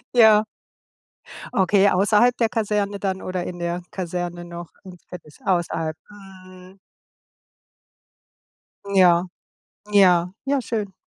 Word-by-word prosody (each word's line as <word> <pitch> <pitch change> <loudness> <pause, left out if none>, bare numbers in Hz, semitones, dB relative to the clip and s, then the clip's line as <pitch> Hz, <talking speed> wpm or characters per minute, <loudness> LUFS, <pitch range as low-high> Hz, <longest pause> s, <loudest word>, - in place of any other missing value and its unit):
Ja. 220 -2 +6 1.1
Okay, 195 +1 +3
außerhalb 210 +6 +3
der 230 -2 +1
Kaserne 205 -2 -2
dann 190 -1 -3
oder 185 -1 -4
in 175 -1 -7
der 170 +1 -3
Kaserne 175 -1 -5
noch? 170 0 -9
Ins 180 -2 -13
Fitness 165 -5 -13
außerhalb. 165 -3 -1
Mhm. 185 -2 -15 2.1
Ja, 180 -2 +4 0.6
ja, 180 -3 +4
ja 275 -1 0
schön. 210 -5 -4
185 Hz, 105 wpm, -22 LUFS, 175-205 Hz, 2.1 s, Ja